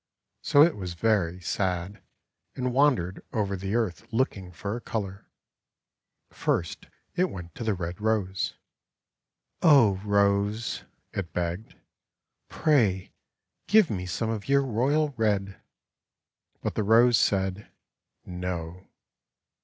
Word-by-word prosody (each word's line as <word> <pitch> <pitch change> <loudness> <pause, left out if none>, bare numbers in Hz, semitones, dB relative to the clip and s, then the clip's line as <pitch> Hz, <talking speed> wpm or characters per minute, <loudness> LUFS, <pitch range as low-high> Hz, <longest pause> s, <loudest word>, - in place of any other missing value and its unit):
So 145 - +6
it 165 0 +3
was 90 -4 -6
very 90 -4 +1
sad 90 +1 -2 0.5
and 125 -1 -2
wandered 125 -10 +2
over 100 -3 0
the 95 +3 -3
earth 105 -9 -1
look 130 +4 +1
ing 95 -3 -9
for 100 +5 -4
a 120 - -6
colour. 100 -4 -5 1.0
First 85 - -2 0.3
it 180 +1 +1
went 85 -3 -8
to - - -6
the 110 -3 0
Red 85 +1 -5
Rose. 105 -3 -1 1.1
:<Oh, 120 - +5
Rose," 100 +2 +1 0.3
it 90 -4 -4
begged, 90 +5 -3 0.7
"pray 110 - +1 0.5
give 210 -5 +5
me 90 -2 -3
some 110 +6 -2
of 110 +2 -5
your 140 0 +4
royal 135 +5 +1
red," 100 -3 0 1.0
but - - -1
the - - -1
Rose 115 +3 +5
said 95 0 0 0.6
'No." 90 0 -5
100 Hz, 120 wpm, -27 LUFS, 90-115 Hz, 1.1 s, So